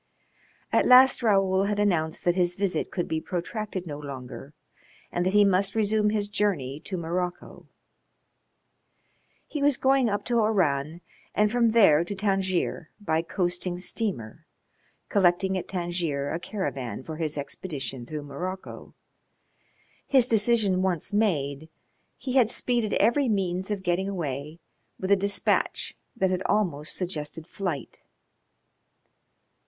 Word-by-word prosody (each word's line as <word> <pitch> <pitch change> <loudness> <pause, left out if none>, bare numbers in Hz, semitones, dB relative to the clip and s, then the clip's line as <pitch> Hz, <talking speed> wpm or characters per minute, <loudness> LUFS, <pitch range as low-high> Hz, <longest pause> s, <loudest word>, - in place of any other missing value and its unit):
At - - +4
last 255 +1 +7
Raoul 195 -3 +3
had 205 0 -1
announced 170 -6 0
that 175 - +4
his 175 -1 +1
visit 195 -1 -1
could 175 - -3
be 160 0 -2
protracted 185 +2 -4
no 145 -3 -6
longer 140 0 -8 0.6
and 175 - 0
that 185 +2 0
he 205 0 +6
must 195 +1 +2
resume 215 -1 +2
his 210 -1 0
journey 180 -10 -1
to 190 - -4
Morocco. 175 +1 -4 1.8
He 295 - -4
was 285 -2 +3
going 265 -2 +3
up 205 0 -2
to 240 -1 +2
Oran 170 -7 +1 0.3
and 210 0 +3
from 235 -1 +3
there 195 -9 +5
to 200 +4 -5
Tangier 190 -4 -1
by 160 -6 0
coasting 175 +1 -2
steamer, 180 - -4 0.6
collecting 190 0 +2
at 185 - -3
Tangier 170 -6 -2
a 165 - -2
caravan 135 - -4
for 155 +1 -7
his 155 -2 -2
expedition 140 -3 -5
through 150 +4 -6
Morocco. 180 +7 -7 1.1
His 260 -3 +5
decision 215 -4 +2
once 185 0 -1
made 160 -8 0 0.5
he 255 - -4
had 250 -5 +4
speeded 235 -3 0
every 240 +5 +3
means 190 -2 -1
of 205 -2 -3
getting 185 +2 0
away 150 -4 -4 0.4
with 190 +1 -2
a - - +8
despatch 200 +1 0 0.2
that 190 -5 +1
had 185 0 -1
almost 170 -8 0
suggested 160 -3 -4
flight. 175 - -5
185 Hz, 135 wpm, -26 LUFS, 160-210 Hz, 1.8 s, a